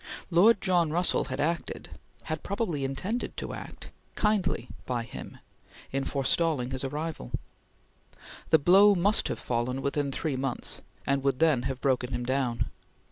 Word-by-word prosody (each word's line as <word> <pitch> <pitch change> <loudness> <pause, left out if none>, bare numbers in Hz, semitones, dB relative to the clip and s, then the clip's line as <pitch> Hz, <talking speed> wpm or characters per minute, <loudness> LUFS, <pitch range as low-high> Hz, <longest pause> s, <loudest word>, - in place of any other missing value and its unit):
Lord 205 +6 +6
John 175 -5 +3
Russell 175 +3 +2
had 130 +1 -4
acted 165 +3 -2 0.3
had 155 -1 -3
probably 185 -8 -2
intended 185 - -3
to - - -4
act - - -9 0.3
kindly 200 - +1 0.2
by 120 -2 -1
him 115 - -9 0.5
in 135 0 -1
forestalling 140 -1 +1
his 130 +1 -3
arrival. 150 - -4 1.2
The 160 - +7
blow 195 +7 +6
must 200 +5 +3
have - - -2
fallen 125 +2 -2
within 140 0 0
three 145 +1 -2
months, 130 -1 -2 0.2
and 140 0 +1
would 140 -2 +2
then 155 -4 +4
have 130 -1 -5
broken 130 -2 +1
him 120 - -2
down. 120 -3 0
140 Hz, 145 wpm, -28 LUFS, 130-175 Hz, 1.2 s, The